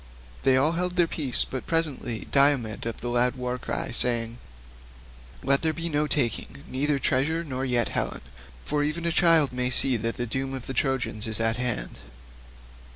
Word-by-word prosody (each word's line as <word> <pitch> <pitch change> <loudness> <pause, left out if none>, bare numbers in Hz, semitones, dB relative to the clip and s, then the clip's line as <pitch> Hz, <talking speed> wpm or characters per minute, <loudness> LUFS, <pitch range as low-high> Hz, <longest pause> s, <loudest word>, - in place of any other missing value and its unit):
They 130 -1 +4
all 145 +4 +3
held 180 +1 -1
their 175 -1 +4
peace, 145 -6 0
but 130 - -6
presently 150 -8 -1
Diomed 135 -6 +2
of 115 - -5
the 120 - -4
loud 120 +1 +2
war 125 0 -3
cry - - -3
spoke, 115 - +4
saying, 115 -1 0 1.1
"Let 140 +1 +2
there 160 -1 +1
be 170 +1 -4
no 150 -1 0
taking, 120 - -1
neither 140 +2 0
treasure, 145 +5 0
nor 130 -4 -4
yet 120 -3 +1
Helen, - - -3 0.4
for 150 0 0
even 155 +3 -2
a 170 - +1
child 165 -5 +5
may 125 0 0
see 130 0 +3
that 115 +1 -3
the 120 - -2
doom 135 +3 -3
of 130 - -7
the 135 - -5
Trojans 125 -4 -1
is 110 -1 -1
at 115 0 +1
hand." 90 - -3
130 Hz, 185 wpm, -26 LUFS, 120-150 Hz, 1.1 s, child